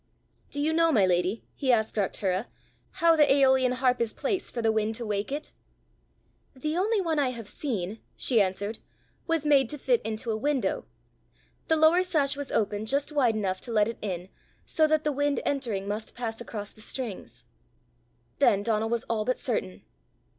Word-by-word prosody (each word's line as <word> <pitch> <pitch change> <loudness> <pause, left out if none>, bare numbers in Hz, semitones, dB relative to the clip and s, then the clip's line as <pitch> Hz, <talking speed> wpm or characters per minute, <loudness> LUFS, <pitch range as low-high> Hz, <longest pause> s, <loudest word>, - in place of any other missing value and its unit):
"Do 285 - -5
you 310 +2 +1
know, 330 0 +4
my 210 -9 +4
lady," 180 +4 0
he 265 -2 +1
asked 220 -2 +2
Arctura, 195 0 -1 0.6
"how 330 -1 +7
the 295 -3 +5
aeolian 265 -2 +4
harp 250 -1 +1
is 230 -2 0
placed 365 +6 -2
for - - -5
the 225 -1 +2
wind 220 0 0
to 235 - -4
wake 205 +2 -2
it?" 295 +2 -5 1.0
"The 305 +4 -3
only 415 +4 +2
one 325 -5 0
I 275 -3 +2
have 235 -4 -7
seen," 215 -6 -3 0.2
she 235 -5 +3
answered, 200 +3 -2 0.5
"was 330 -3 0
made 275 -5 +4
to 295 - -4
fit 485 - +1
into 220 +2 -3
a - - 0
window; 255 -3 -1 0.8
the 320 - +3
lower 315 +3 +5
sash 295 -6 +1
was 285 -1 -6
opened 210 0 0
just 280 +4 0
wide 255 -7 +2
enough 190 -3 -2
to 240 - -6
let 210 -2 +3
it 230 - -5
in, 185 -3 -4 0.4
so 315 -1 +2
that 310 0 +2
the 300 - +1
wind 285 -1 0
entering 230 -9 -1
must 210 +2 -4
pass 230 -1 -4
across 210 -3 -6
the 215 - -17
strings." 230 -3 -5 0.9
Then 200 0 +4
Donal 220 0 0
was 235 0 -1
all 225 -2 -1
but 255 +3 0
certain. 95 - -3
240 Hz, 185 wpm, -27 LUFS, 215-290 Hz, 1.0 s, how